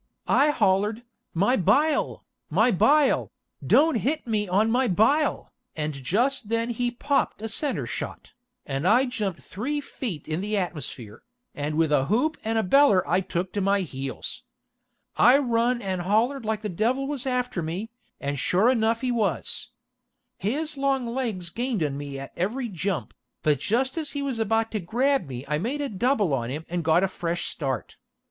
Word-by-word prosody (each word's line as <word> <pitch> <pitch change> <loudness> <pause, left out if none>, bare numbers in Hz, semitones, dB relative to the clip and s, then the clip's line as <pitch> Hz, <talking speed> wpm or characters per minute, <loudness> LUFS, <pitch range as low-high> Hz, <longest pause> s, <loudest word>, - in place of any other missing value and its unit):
I 295 - +4
hollered, 210 -3 +1 0.3
"My 200 +9 +3
bile, 275 - +2 0.2
my 220 +10 +3
bile, 275 - +3 0.3
don't 310 -3 +4
hit 295 +7 -1
me 215 -3 0
on 205 +5 +2
my 255 +2 +2
bile," 255 - +2 0.2
and 155 -1 -2
just 210 - 0
then 230 +1 0
he 245 +1 0
popped 275 +4 0
a 220 - -4
center 280 +5 0
shot, - - -6 0.3
and 135 +4 -2
I 240 +6 +5
jumped 210 -8 -3
three 270 +10 -3
feet 230 - -6
in 160 +3 -2
the 210 +1 -1
atmosphere, 140 - -4 0.3
and 145 +1 -3
with 160 -2 +2
a 135 -2 +3
hoop 250 - +1
and 225 +1 0
a 220 - +2
beller 205 -2 +4
I 180 - +3
took 180 0 -3
to 205 - -1
my 195 +1 +2
heels. 135 -6 -5 0.8
I 245 +4 +7
run 240 -2 +1
and 190 -2 -2
hollered 225 +7 +1
like 215 0 -2
the - - -1
devil 235 +9 0
was 275 -2 -3
after 250 -7 -1
me, 180 +8 -4 0.3
and 140 0 -3
shore 195 - +3
enuf 230 -2 +1
he 255 -1 0
was. 210 - -1 0.7
His 295 - -2
long 275 -2 +1
legs 230 -8 -3
gained 235 -5 -1
on 145 -2 -1
me 140 -1 -6
at 135 0 -8
every 235 +8 -2
jump, 190 -1 -3 0.3
but 150 -3 +2
just 260 - 0
as 300 -3 -4
he 285 -1 -2
was 265 -5 -2
about 225 +1 +1
to 215 - -1
grab 250 - +1
me 130 0 -6
I 150 +1 0
made 250 - -2
a 285 -1 -2
double 210 - +1
on 120 -3 -1
him, 150 +5 -5
and 175 0 -2
got 165 +3 +4
a - - +3
fresh 175 -2 -3
start. 135 -4 -3
215 Hz, 180 wpm, -25 LUFS, 175-255 Hz, 0.8 s, I